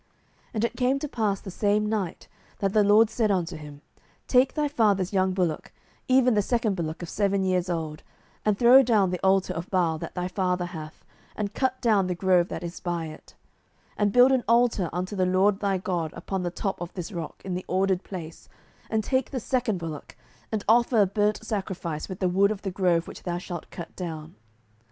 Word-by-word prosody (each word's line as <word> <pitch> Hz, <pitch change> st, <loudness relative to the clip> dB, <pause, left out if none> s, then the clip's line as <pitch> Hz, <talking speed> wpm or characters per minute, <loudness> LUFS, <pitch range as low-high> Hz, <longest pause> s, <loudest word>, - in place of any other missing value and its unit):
07:006:025 -, -, -40 dB, 0.5 s
And 220 Hz, +1 st, +1 dB
it -, -, -3 dB
came 260 Hz, +1 st, +2 dB
to 300 Hz, -, -4 dB
pass 215 Hz, -7 st, -1 dB
the 190 Hz, -, -8 dB
same 210 Hz, +2 st, +1 dB
night, 210 Hz, -5 st, -3 dB, 0.3 s
that 195 Hz, -1 st, -1 dB
the 215 Hz, -, +5 dB
LORD 210 Hz, +2 st, +5 dB
said 220 Hz, -2 st, +1 dB
unto 180 Hz, -3 st, 0 dB
him, 150 Hz, -2 st, -10 dB, 0.5 s
Take 255 Hz, +1 st, +3 dB
thy 300 Hz, -1 st, +1 dB
father's 205 Hz, -8 st, +1 dB
young 190 Hz, -1 st, +2 dB
bullock, 175 Hz, -5 st, -1 dB, 0.4 s
even 255 Hz, -1 st, +4 dB
the 210 Hz, -, +3 dB
second 225 Hz, -1 st, 0 dB
bullock 165 Hz, -1 st, -4 dB
of -, -, -5 dB
seven 200 Hz, -1 st, +1 dB
years 185 Hz, -1 st, 0 dB
old, 160 Hz, -3 st, -3 dB, 0.4 s
and 210 Hz, -2 st, +1 dB
throw 245 Hz, +4 st, +8 dB
down 215 Hz, -7 st, +2 dB
the 180 Hz, -, -4 dB
altar 190 Hz, 0 st, +3 dB
of 170 Hz, +3 st, -6 dB
Baal 170 Hz, -4 st, +1 dB
that -, -, -7 dB
thy 180 Hz, 0 st, -2 dB
father 180 Hz, -1 st, -1 dB
hath, 160 Hz, -3 st, -9 dB, 0.3 s
and 205 Hz, -1 st, -3 dB
cut 260 Hz, -1 st, 0 dB
down 210 Hz, -6 st, +3 dB
the 180 Hz, -, -1 dB
grove 180 Hz, -1 st, +3 dB
that -, -, -6 dB
is 170 Hz, 0 st, -6 dB
by 175 Hz, -2 st, -2 dB
it: 155 Hz, -, -14 dB, 0.6 s
07:006:026 -, -, -31 dB
And 205 Hz, -1 st, +2 dB
build 250 Hz, +2 st, +7 dB
an 260 Hz, -2 st, +2 dB
altar 230 Hz, -6 st, +3 dB
unto 185 Hz, +4 st, -3 dB
the 185 Hz, -2 st, +1 dB
LORD 195 Hz, +2 st, +3 dB
thy 200 Hz, -2 st, 0 dB
God 175 Hz, -4 st, -2 dB
upon 190 Hz, +2 st, -4 dB
the 175 Hz, -, -1 dB
top 190 Hz, +2 st, -4 dB
of 175 Hz, 0 st, -5 dB
this 180 Hz, +2 st, -5 dB
rock, 170 Hz, -5 st, -6 dB
in 190 Hz, -, -3 dB
the 180 Hz, +1 st, -4 dB
ordered 190 Hz, 0 st, +1 dB
place, 165 Hz, -4 st, -8 dB, 0.4 s
and 220 Hz, -1 st, 0 dB
take 260 Hz, +3 st, 0 dB
the 265 Hz, -, -3 dB
second 245 Hz, -4 st, 0 dB
bullock, 165 Hz, -3 st, -7 dB, 0.4 s
and 215 Hz, -2 st, -2 dB
offer 235 Hz, +1 st, +4 dB
a 205 Hz, -, +6 dB
burnt 210 Hz, +3 st, 0 dB
sacrifice 185 Hz, -7 st, -4 dB
with 185 Hz, -, -5 dB
the 185 Hz, -, +1 dB
wood 195 Hz, +3 st, +3 dB
of 210 Hz, -2 st, -4 dB
the 195 Hz, -, -2 dB
grove 180 Hz, -3 st, +1 dB
which -, -, -9 dB
thou 175 Hz, -1 st, -3 dB
shalt 175 Hz, -2 st, -7 dB
cut 170 Hz, -2 st, -9 dB
down. 160 Hz, -3 st, -6 dB
190 Hz, 215 wpm, -26 LUFS, 175-215 Hz, 0.6 s, throw